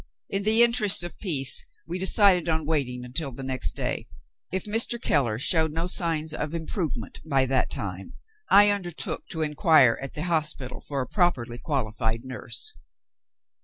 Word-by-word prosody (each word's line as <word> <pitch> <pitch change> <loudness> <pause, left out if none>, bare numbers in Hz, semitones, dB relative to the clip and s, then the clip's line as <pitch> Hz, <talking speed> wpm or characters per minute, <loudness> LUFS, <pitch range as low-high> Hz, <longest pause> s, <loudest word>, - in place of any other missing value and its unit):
In 195 - -1
the 220 +3 +4
interests 230 -6 +5
of 175 - -8
peace 140 -10 +1 0.2
we 175 +2 -5
decided 190 -2 +4
on 160 -1 0
waiting 130 -5 -1
until 135 +3 -3
the 135 +2 -8
next 130 - -2
day. - - -3 0.4
If 190 0 -3
Mr. 225 +3 +1
Keller 125 - +1
showed 160 +5 +2
no 165 +2 -2
signs 165 -4 0
of 150 +1 -4
improvement 160 - -4
by 135 -2 +3
that 130 0 +1
time, 95 -1 -6 0.3
I 205 +1 +7
undertook 180 -5 -3
to 160 -1 -2
inquire 150 -5 +4
at 135 - -7
the 150 - -3
hospital 155 -6 -1
for 140 -2 -4
a 125 - -4
properly 120 - 0
qualified 115 -5 -2
nurse. 125 -2 -5
155 Hz, 160 wpm, -25 LUFS, 130-175 Hz, 0.4 s, I